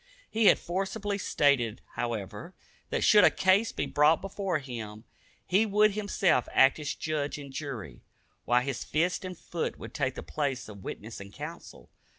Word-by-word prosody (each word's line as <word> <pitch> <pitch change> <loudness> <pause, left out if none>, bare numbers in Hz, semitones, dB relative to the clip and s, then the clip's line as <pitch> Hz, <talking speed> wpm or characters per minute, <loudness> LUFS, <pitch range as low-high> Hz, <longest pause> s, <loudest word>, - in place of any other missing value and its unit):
He 225 0 +2
had - - +7
forcibly 195 +3 -3
stated, 130 - +2
however, 115 - -4 0.3
that - - -1
should 210 -1 +7
a - - +8
case 190 +4 +3
be - - -2
brought 150 +3 +4
before 195 -2 -2
him, 115 -6 -7 0.4
he 195 +4 +3
would 210 0 +4
himself 200 - +1
act 135 +3 +5
as 150 -1 -3
judge 150 -2 -2
and 140 -2 -9
jury, 125 - -6 0.4
while 120 +1 +3
his 135 -1 -3
fist 175 +5 0
and 185 -2 -6
foot 170 0 -4
would - - -9
take 130 -3 -1
the - - -6
place 140 -4 -2
of 100 -3 -11
witness 115 +2 -7
and 100 0 -10
counsel. - - -9
150 Hz, 165 wpm, -29 LUFS, 125-190 Hz, 0.4 s, a